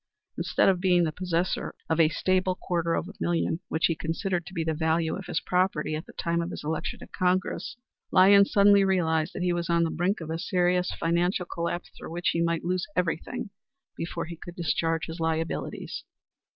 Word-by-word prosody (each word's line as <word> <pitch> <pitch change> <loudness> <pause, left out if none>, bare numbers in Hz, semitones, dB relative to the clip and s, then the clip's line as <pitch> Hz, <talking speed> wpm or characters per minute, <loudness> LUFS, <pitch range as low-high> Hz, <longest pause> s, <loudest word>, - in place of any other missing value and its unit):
Instead - - +2
of 190 -2 +4
being 180 -2 +4
the 160 - 0
possessor 180 +1 -1
of 160 0 0
a 160 -2 +6
stable 185 +1 +1
quarter 170 -2 -1
of 170 - -2
a 200 - -9
million, 170 -1 0
which 160 - +1
he 165 - +3
considered 175 +2 -2
to 190 - -10
be 165 - 0
the 160 0 0
value 160 +1 +1
of 195 - -7
his - - 0
property 180 -4 0
at 155 +2 -4
the - - -13
time 170 0 -1
of 170 - -3
his - - -7
election 155 +1 -2
to - - -11
Congress, 185 +5 -1 0.3
Lyons 200 +1 +6
suddenly 200 0 +6
realized 160 -5 +1
that 180 - -3
he 180 -1 +2
was 175 0 -2
on 170 0 +3
the 165 - 0
brink 180 +5 0
of 160 -1 -6
a 165 - -2
serious 180 0 +1
financial 175 +2 +1
collapse 170 0 -4
through - - -9
which 175 +1 0
he 170 - 0
might 170 -1 0
lose 180 0 -1
everything 180 +6 -2 0.4
before 170 0 -4
he 170 +1 -7
could 175 +1 -10
discharge 165 -1 0
his 165 +1 -7
liabilities. 160 0 -2
170 Hz, 205 wpm, -27 LUFS, 165-185 Hz, 0.4 s, a